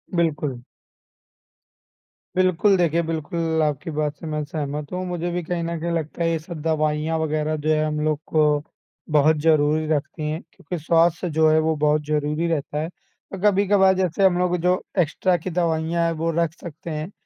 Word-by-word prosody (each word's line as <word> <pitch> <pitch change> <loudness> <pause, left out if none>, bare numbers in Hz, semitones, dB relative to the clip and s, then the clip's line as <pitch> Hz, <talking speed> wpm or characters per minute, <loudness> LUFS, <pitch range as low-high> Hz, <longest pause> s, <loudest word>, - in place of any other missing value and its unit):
बिल्कुल। 150 -7 0 1.7
बिल्कुल, 185 +2 +3
देखिए, 170 -1 +2
बिल्कुल, 160 0 -1
आपकी 150 +2 -2
बात 150 -1 -1
से 165 - -11
मैं 150 -1 -2
सहमत 145 -1 -4
हूँ। 185 0 -2
मुझे 175 -1 -3
भी 175 - -2
कहीं 170 +1 -2
न 170 0 -3
कहीं 170 +2 -2
लगता 165 0 -2
है, 165 - +2
ये 165 - +1
सब 160 -1 -8
दवाइयाँ 155 0 0
वगैरह, 155 0 -1
जो 155 +1 -3
है, 155 0 +3
हम 150 0 -2
लोग 155 -1 0
को 155 -1 +3 0.7
बहुत 155 +1 +4
ज़रूरी 155 0 +3
रखती 155 0 -2
हैं, 155 +3 -3
क्योंकि 180 - -6
स्वास्थ्य 170 +1 +2
जो 160 0 +3
है, 155 - +4
वो 160 0 +1
बहुत 150 0 +2
ज़रूरी 150 +2 0
रहता 150 -2 -2
है। 160 - -3
तो 190 +1 -14
कभी-कभार 195 -1 +4
जैसे 185 0 0
हम 180 -2 +4
लोग, 180 0 +1
जो 180 +2 +1 0.2
एक्स्ट्रा 180 +3 +2
की 180 +3 -5
दवाइयाँ 170 -1 0
हैं, 165 - +1
वो 165 +1 -2
रख 170 -2 +1
सकते 170 -1 -9
हैं, 155 +5 -4
160 Hz, 185 wpm, -23 LUFS, 155-170 Hz, 1.7 s, बहुत